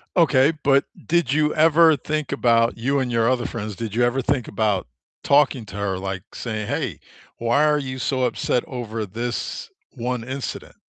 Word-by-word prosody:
Okay, 150 -4 +4
but 140 -1 +4 0.2
did 155 -5 +2
you 150 0 +2
ever 160 0 +5
think 150 +1 -3
about 115 -1 +2
you 135 +4 0
and 125 -2 -1
your 115 0 +2
other 125 -2 +1
friends, 105 -3 -5
did 110 0 -5
you 120 - +3
ever 125 +2 +1
think 130 -2 -1
about 105 -2 0 0.4
talking 140 -5 +3
to 100 - -11
her, 100 -2 -2
like 95 +1 -6
saying, 110 -3 -4
"Hey, - - -3 0.4
why 120 +6 +2
are 150 -1 +3
you 130 -1 -5
so 130 0 -1
upset 125 0 0
over 115 -4 -5
this 120 - -4 0.2
1 125 -1 -3
incident?" 130 +2 -6
125 Hz, 175 wpm, -22 LUFS, 115-140 Hz, 0.4 s, ever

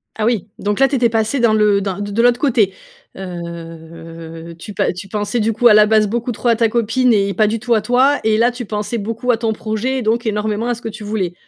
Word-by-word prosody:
Ah 215 - -2
oui, 225 -5 0
donc 205 0 -2
là 270 - +5
tu 280 - -2
étais 240 -2 +2
passé 225 +4 0
dans 235 -2 +3
le 210 -2 +3
dans 195 -1 -4
de 205 0 -4
de 230 - +1
l'autre 245 0 +3
côté. 225 -9 +1 0.4
Heu, 165 -2 -9
tu 210 - -9
pa - - 0
tu 185 +3 -9
pensais, 210 +4 -2
du 225 +1 +1
coup, 240 +3 +4
à 225 - +7
la 210 0 +6
base, 215 -1 +3
beaucoup 235 +3 -2
trop 240 +1 -2
à 230 - +4
ta 225 0 +2
copine 235 +2 +1
et 200 -1 +1
pas 215 +1 +2
du 225 +2 -1
tout 240 +2 0
à 220 - +2
toi, 255 +6 +2
et 220 0 +2
là, 235 +2 +3
tu 245 0 -7
pensais 210 +2 -3
beaucoup 230 +4 -2
à 230 - +1
ton 225 -1 -1
projet 220 +5 -3
et - - -3
donc 230 +2 0
énormément 210 +1 -1
à 245 - 0
ce 235 - -14
que 225 - -3
tu 215 0 -9
voulais. 205 -4 -2
215 Hz, 265 wpm, -18 LUFS, 200-235 Hz, 0.4 s, à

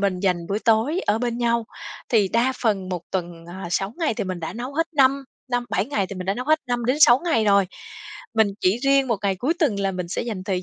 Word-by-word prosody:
mình 195 -2 0
dành 180 -3 0
buổi 200 +3 -1
tối 230 +11 +2
ở 210 +2 +2
bên 240 0 -2
nhau, 235 -1 +1 0.4
thì 210 -6 +3
đa 240 +5 +2
phần 200 -5 0
1 180 -2 -3
tuần, 175 -2 -4
ờ, 175 0 -7
6 195 +3 -1
ngày 315 -9 0
thì - - -3
mình 185 -2 -4
đã 160 - -4
nấu 250 +4 -6
hết 330 +1 +1
năm 275 0 +4 0.3
năm 245 -1 0
bảy 190 +3 0
ngày 210 -9 -1
thì 200 - -8
mình 185 -1 -6
đã 195 - +1
nấu 250 - -4
hết 310 +3 +3
5-6. 245 +1 +4
ngày 230 -11 +2
rồi, 200 -2 +4 0.7
mình 220 -1 +4
chỉ 190 +6 +2
riêng 275 -1 +3
1 230 - +1
ngày 195 -2 0
cuối 270 - 0
tuần 225 -11 +1
là 195 -1 0
mình 180 -1 -4
sẽ - - -2
dành 215 -6 -5
thời 185 -2 -1
220 Hz, 250 wpm, -23 LUFS, 190-245 Hz, 0.7 s, năm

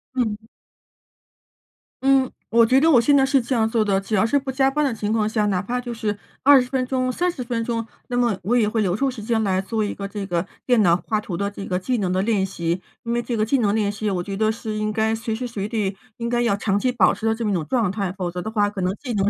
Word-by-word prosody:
嗯。 220 -3 -2 1.6
嗯， 270 -1 +4 0.2
我 230 0 +5
觉 255 +4 +4
得 320 +3 +4
我 250 - +7
现 285 +5 +4
在 270 -1 +5
是 270 0 +3
这 245 +2 -2
样 220 -1 +2
做 225 -1 +2
的。 195 -2 +1
只 205 +2 -2
要 205 - +3
是 285 +5 +2
不 270 -1 -3
加 265 0 +2
班 300 +2 0
的 265 - 0
情 210 -1 -3
况 215 -2 +1
下 215 -1 0
哪 185 -3 +1
怕 245 +6 -2
就 240 -1 -5
是 210 -2 -2 0.3
20 270 -3 +6
分 260 -1 0
钟、 255 0 0
30 345 -4 -1
分 235 -1 -2
钟， 230 -1 -2 0.2
那 245 - -1
么 235 -5 +2
我 235 +6 +1
也 220 -3 +3
会 220 +1 0
留 185 -3 +1
出 270 +6 +1
时 245 -5 -7
间 225 0 +1
来 190 -1 +1
做 220 +2 -2
一 205 - -2
个 200 - -5
这 200 0 -5
个 175 -2 -1 0.2
电 245 -4 +4
脑 170 -3 +5
画 215 -2 +1
图 195 -4 -5
的 200 +1 -1
这 200 -1 -8
个 180 -1 -1
技 250 +6 -1
能 190 -4 -1
的 185 - +1
练 200 -2 +1
习。 175 -1 -2 0.2
因 235 -1 -2
为 240 - +1
这 235 - -3
个 215 - +2
技 275 +5 +2
能 205 -4 +2
练 210 -2 +1
习 210 +1 -3
我 185 -3 -1
觉 195 +2 -5
得 215 +2 +2
是 220 -1 -5
应 215 0 -1
该 220 +1 +1
随 225 0 -3
时 245 +3 -3
随 210 -4 -4
地 210 -3 -2 0.2
应 235 - -3
该 240 0 +1
要 235 -4 +2
长 200 -1 0
期 255 +4 +1
保 210 -7 +4
持 225 - -6
的 225 - +3
这 225 +1 -4
么 210 - +1
一 - - +1
种 170 -4 -1
状 230 - +1
态。 195 -2 -2
否 185 -2 -4
则 180 +1 -5
的 220 - -5
话， 205 -2 +2
可 200 -2 -5
能 185 +1 0
技 250 +1 -6
能 200 -1 +2
220 Hz, 305 characters per minute, -22 LUFS, 200-245 Hz, 1.6 s, 我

